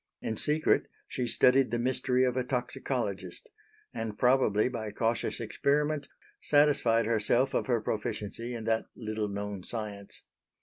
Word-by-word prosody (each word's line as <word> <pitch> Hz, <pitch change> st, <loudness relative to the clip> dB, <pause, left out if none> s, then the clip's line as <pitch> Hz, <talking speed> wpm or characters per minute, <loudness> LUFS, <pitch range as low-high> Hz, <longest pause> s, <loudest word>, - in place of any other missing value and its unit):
In 110 Hz, -, -3 dB
secret 150 Hz, +7 st, +2 dB, 0.2 s
she 125 Hz, -2 st, -2 dB
studied 130 Hz, +3 st, +4 dB
the 120 Hz, -, -1 dB
mystery 125 Hz, +1 st, +1 dB
of 125 Hz, -1 st, +1 dB
a 130 Hz, -, +1 dB
toxicologist; 125 Hz, -, -3 dB, 0.5 s
and, 110 Hz, -2 st, -4 dB
probably 125 Hz, -5 st, +3 dB
by 115 Hz, -4 st, -4 dB
cautious 115 Hz, +3 st, -1 dB
experiment, 145 Hz, +5 st, 0 dB, 0.3 s
satisfied 145 Hz, -6 st, +3 dB
herself 115 Hz, +4 st, +2 dB
of -, -, 0 dB
her 120 Hz, -3 st, +2 dB
proficiency 110 Hz, +2 st, -3 dB
in 115 Hz, -, -5 dB
that 115 Hz, 0 st, 0 dB
little 110 Hz, -2 st, -3 dB
known 100 Hz, -1 st, -4 dB
science. 105 Hz, -1 st, -7 dB
120 Hz, 135 wpm, -30 LUFS, 110-130 Hz, 0.5 s, studied